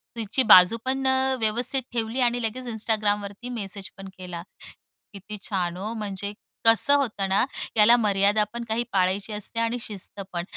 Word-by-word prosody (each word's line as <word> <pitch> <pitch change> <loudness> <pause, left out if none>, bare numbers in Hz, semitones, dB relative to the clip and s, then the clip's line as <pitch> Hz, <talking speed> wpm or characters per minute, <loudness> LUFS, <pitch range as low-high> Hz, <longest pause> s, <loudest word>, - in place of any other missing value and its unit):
तिची 230 +3 0
बाजू 185 +1 +7
पण 265 0 0
अ, 265 0 +2
व्यवस्थित 240 +5 0
ठेवली 230 +1 -2
आणि 245 0 +1
लगेच 245 +3 -3
Instagramवरती 210 0 -2
मेसेज 200 -5 -5
पण 195 0 -9
केला. 180 -2 -7 0.7
किती 205 +2 -9
छान 180 -4 -3
हो 210 +4 -4
म्हणजे, 205 -2 -5 0.3
कसं 230 +5 +6
होतं 220 -8 -1
ना, 195 +5 +3 0.3
याला 220 +3 +7
मर्यादा 205 -1 +2
पण 235 0 -4
काही 230 +2 0
पाळायची 195 +3 0
असते 210 +2 -2
आणि 230 +1 0
शिस्त 205 -2 -7
पण. 175 - -2
215 Hz, 160 wpm, -25 LUFS, 195-235 Hz, 0.7 s, बाजू